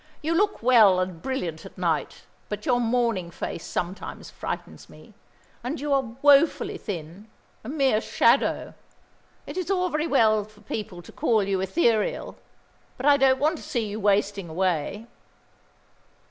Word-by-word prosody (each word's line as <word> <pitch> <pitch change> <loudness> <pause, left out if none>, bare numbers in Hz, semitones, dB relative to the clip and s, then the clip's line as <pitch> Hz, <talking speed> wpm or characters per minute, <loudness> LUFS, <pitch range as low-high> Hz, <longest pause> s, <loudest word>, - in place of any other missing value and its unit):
"You 320 +2 0
look 405 - +1
well 220 -7 +6
and 185 -3 -3
brilliant 180 -12 -3
at - - -13
night, 170 -4 -2 0.3
but 210 0 -5
your 245 -1 +2
morning 230 -6 0
face 170 -1 -6
sometimes 180 +2 -5
frightens - - -6
me; - - -16 0.5
and 255 +5 -3
you 290 +1 -1
are 260 -4 0
woefully 290 +2 +4
thin, 180 +1 -7 0.4
a 220 - -7
mere 270 -7 +2
shadow. - - +2 0.7
It - - -8
is 370 -1 -3
all 365 -2 +1
very 305 0 -1
well 220 -7 +3
for 210 0 -18
people 205 -4 -6
to - - -13
call 220 -3 +1
you 195 -1 -1
ethereal, 220 - 0 0.6
but 260 - -5
I 290 -1 +7
don't 265 -1 +4
want 305 +5 +1
to - - -11
see 235 -4 -2
you 210 +1 -5
wasting 200 -2 +1
away." 185 +4 -1
220 Hz, 155 wpm, -25 LUFS, 190-270 Hz, 0.7 s, I